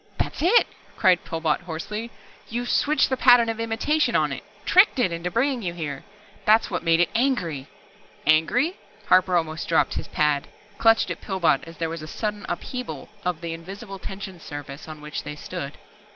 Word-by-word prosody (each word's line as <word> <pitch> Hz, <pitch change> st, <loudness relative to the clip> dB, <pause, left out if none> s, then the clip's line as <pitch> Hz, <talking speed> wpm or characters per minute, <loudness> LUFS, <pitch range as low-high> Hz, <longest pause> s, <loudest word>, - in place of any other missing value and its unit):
"That's -, -, -3 dB
it!" 375 Hz, +9 st, +5 dB, 0.3 s
cried 185 Hz, -4 st, +4 dB
Pillbot 160 Hz, -2 st, 0 dB
hoarsely. 185 Hz, +7 st, -5 dB, 0.4 s
"You 240 Hz, +2 st, -2 dB
switched 295 Hz, +3 st, +2 dB
the 260 Hz, -, +1 dB
pattern 245 Hz, -2 st, +6 dB
of 225 Hz, 0 st, -3 dB
imitation 230 Hz, +7 st, +1 dB
on -, -, +2 dB
It -, -, -5 dB, 0.2 s
tricked 370 Hz, -4 st, +5 dB
It 245 Hz, -8 st, +2 dB
into 170 Hz, +1 st, -3 dB
bringing 250 Hz, +5 st, +1 dB
you 175 Hz, -4 st, -3 dB
here. 145 Hz, -5 st, -5 dB, 0.4 s
That's 220 Hz, 0 st, +4 dB
what 180 Hz, -, -1 dB
made 165 Hz, -1 st, +3 dB
it 175 Hz, -, +3 dB
angry 180 Hz, -, 0 dB, 0.3 s
" -, -, -28 dB
"Angry?" 235 Hz, -, +3 dB, 0.3 s
Harper 185 Hz, -1 st, +5 dB
almost 160 Hz, -1 st, -2 dB
dropped 165 Hz, -, +2 dB
his -, -, -4 dB
pad, 150 Hz, -2 st, +1 dB, 0.3 s
clutched 225 Hz, 0 st, +4 dB
at -, -, -5 dB
Pillbot 180 Hz, -8 st, +1 dB
as 165 Hz, 0 st, -12 dB
there 165 Hz, -, -1 dB
was 165 Hz, 0 st, -5 dB
a 155 Hz, -, -7 dB
sudden 210 Hz, +4 st, -4 dB
upheaval 250 Hz, +8 st, -5 dB
of 180 Hz, -3 st, -2 dB
the 170 Hz, -1 st, -4 dB
invisible 195 Hz, +4 st, -8 dB
tension 190 Hz, -1 st, -7 dB
surface 145 Hz, -1 st, -8 dB
on 155 Hz, -1 st, -9 dB
which 150 Hz, 0 st, -5 dB
they 150 Hz, -, -7 dB
stood. 145 Hz, -1 st, -6 dB
180 Hz, 180 wpm, -24 LUFS, 160-230 Hz, 0.4 s, pattern